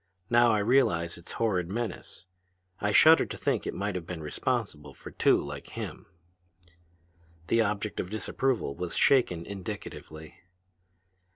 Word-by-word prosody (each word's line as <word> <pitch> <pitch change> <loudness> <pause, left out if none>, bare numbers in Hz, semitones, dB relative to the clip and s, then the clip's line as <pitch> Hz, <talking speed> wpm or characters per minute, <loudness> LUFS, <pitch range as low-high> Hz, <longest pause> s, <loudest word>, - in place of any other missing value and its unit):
Now 120 0 +6
I 110 - +3
realize 100 -7 +2
its 85 0 -10
horrid 90 -7 0
menace. 105 -4 -5 0.5
I 105 - 0
shudder 160 +8 +7
to - - -7
think - - -1
it - - -2
might 100 +1 -2
have 90 -2 -5
been 85 -3 -6
responsible 75 - -3
for - - -11
two - - +3
like 70 0 -6
him!" - - -6 1.4
The 115 +6 +2
object 105 -2 -2
of 90 - -3
disapproval 110 - -1
was 90 0 -5
shaken 90 -11 +3
indicatively. 80 -5 -8
100 Hz, 135 wpm, -28 LUFS, 85-115 Hz, 1.4 s, shudder